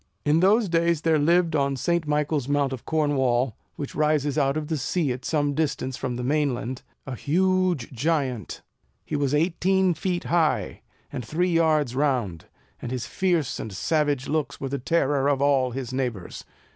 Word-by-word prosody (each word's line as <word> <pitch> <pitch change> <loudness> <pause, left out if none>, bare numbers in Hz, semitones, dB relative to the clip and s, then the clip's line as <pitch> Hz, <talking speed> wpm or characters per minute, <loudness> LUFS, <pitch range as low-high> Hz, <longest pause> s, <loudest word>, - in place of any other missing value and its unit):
In 150 +2 +3
those 205 +5 +4
days 170 -2 +1
there 160 -2 +3
lived 170 +2 +3
on 140 -1 +1
St. 170 +4 0
Michael's 150 -2 0
Mount 140 -1 +1
of 130 - -8
Cornwall, 130 -6 +1 0.2
which 145 - -6
rises 150 -2 +1
out 140 -1 +1
of 155 -1 -3
the 160 0 -1
sea 145 +1 -1
at 125 +1 -5
some 145 -2 0
distance 135 -4 -1
from 125 -1 -3
the 125 - -4
main 145 0 +1
land, 125 +2 -5 0.2
a 130 - -5
huge 180 0 +1
giant. 130 - -2 0.4
He - - -3
was 145 -1 +1
eighteen 185 +3 +2
feet 180 +1 -2
high, 165 -2 0 0.3
and 125 - -4
three 175 +8 0
yards 155 -6 +2
round; 125 - 0 0.4
and 120 - -5
his 125 -2 -3
fierce 175 -7 0
and 110 - -5
savage 145 - 0
looks 155 -1 -2
were 135 - -4
the 140 +1 -3
terror 140 -1 +1
of 140 -2 +1
all 140 -2 +3
his 130 0 -5
neighbours. 120 -9 -4
145 Hz, 175 wpm, -25 LUFS, 130-165 Hz, 0.4 s, those